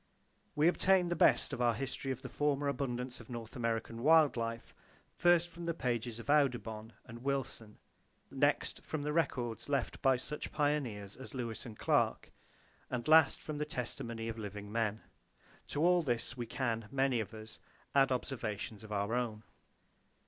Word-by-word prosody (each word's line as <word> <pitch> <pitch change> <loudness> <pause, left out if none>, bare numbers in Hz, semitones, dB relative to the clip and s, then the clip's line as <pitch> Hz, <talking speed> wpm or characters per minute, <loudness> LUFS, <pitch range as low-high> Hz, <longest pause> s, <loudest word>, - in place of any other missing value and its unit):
We 150 +2 +4
obtain 180 0 +4
the 175 - 0
best - - +4
of 125 - -3
our 120 -2 +3
history 135 +1 -3
of 130 0 -5
the - - -4
former 145 -1 0
abundance 125 -2 -2
of 115 - -13
North 115 -2 -7
American 115 -1 -2
wild 155 +1 +6
life 115 0 -4 0.4
first 175 -1 +4
from 170 0 -8
the 170 - 0
pages 120 -4 -2
of 115 - -9
Audubon 120 -6 +1
and 120 -1 -10
Wilson; 130 -5 -3 0.5
next, - - +1
from 155 -2 -4
the 150 0 -1
records 125 -8 -1
left 140 -4 -1
by 135 -1 +5
such 150 +4 -6
pioneers 130 -10 -1
as 135 +2 -9
Lewis 120 -2 -4
and 110 -2 -9
Clark, - - +1 0.6
and 125 0 -3
last 160 +1 +6
from 150 -1 -4
the - - +1
testimony 115 -5 -4
of 115 0 -4
living 105 -1 -6
men. 110 -1 0 0.7
To 150 +3 0
all 180 0 +5
this 120 -4 -2
we 120 -2 -4
can, 115 -3 -2
many 135 -2 +2
of 110 - -3
us, 110 0 -10 0.3
add 135 -1 +5
observations 115 -5 -3
of 110 - -11
our 100 +2 -1
own. 115 -3 -1
125 Hz, 170 wpm, -34 LUFS, 115-145 Hz, 0.7 s, wild